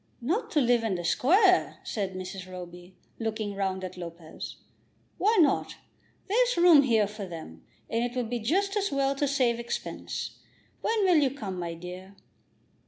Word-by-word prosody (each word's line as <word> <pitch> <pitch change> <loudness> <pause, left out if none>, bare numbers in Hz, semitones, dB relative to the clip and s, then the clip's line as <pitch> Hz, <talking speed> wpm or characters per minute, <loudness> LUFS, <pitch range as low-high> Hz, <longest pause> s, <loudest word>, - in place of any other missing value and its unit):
"Not 405 - -1
to 305 - +4
live 240 -2 +3
in 215 -4 0
the 175 - -4
Square?" 365 - +4
said 195 -3 -3
Mrs. 185 0 -7
Roby, 180 0 -10 0.2
looking 220 -2 -2
round 190 -1 -2
at 185 0 -6
Lopez. 170 -2 -8 0.6
"Why 430 +4 +3
not? 310 - +3 0.5
There's 485 +2 +2
room 340 -4 +8
here 225 -6 +3
for 205 -1 -7
them, 160 - -9 0.2
and 230 +1 0
it 245 +1 -3
will 250 -1 0
be 240 +2 -3
just 390 - +1
as 405 -3 0
well 275 0 +1
to 285 +1 0
save 255 -4 +1
expense. 235 - -5 0.4
When 445 -2 +1
will 360 -3 +5
you 285 -3 +4
come, 205 -9 -6
my 170 -1 -4
dear?" 180 +3 -9
230 Hz, 170 wpm, -28 LUFS, 185-295 Hz, 0.6 s, room